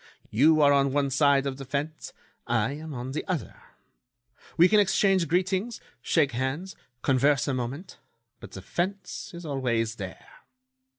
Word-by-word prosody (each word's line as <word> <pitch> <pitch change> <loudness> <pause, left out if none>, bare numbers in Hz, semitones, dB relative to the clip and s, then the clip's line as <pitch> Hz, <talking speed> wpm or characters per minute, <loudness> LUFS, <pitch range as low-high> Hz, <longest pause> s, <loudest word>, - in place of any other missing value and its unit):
You 155 +7 +4
are 145 -1 +6
on 140 -1 +3
one 140 -1 +1
side 140 0 +3
of 135 -1 -3
the 140 - -7
fence; 145 +4 -4 0.4
I 115 +1 +1
am 155 +2 -7
on 125 -1 -5
the 150 - -3
other. 180 -5 -4 1.0
We 170 +2 +7
can 215 +2 +4
exchange 195 -3 +3
greetings, 185 +7 0 0.2
shake 145 -5 +2
hands, 135 +10 -3 0.3
converse 140 +1 +2
a 140 - 0
moment, 130 +9 -5 0.4
but - - -12
the 95 - -8
fence 190 - -4
is 170 0 -9
always 120 -6 -1
there. 95 -2 -9
145 Hz, 155 wpm, -27 LUFS, 130-170 Hz, 1.0 s, We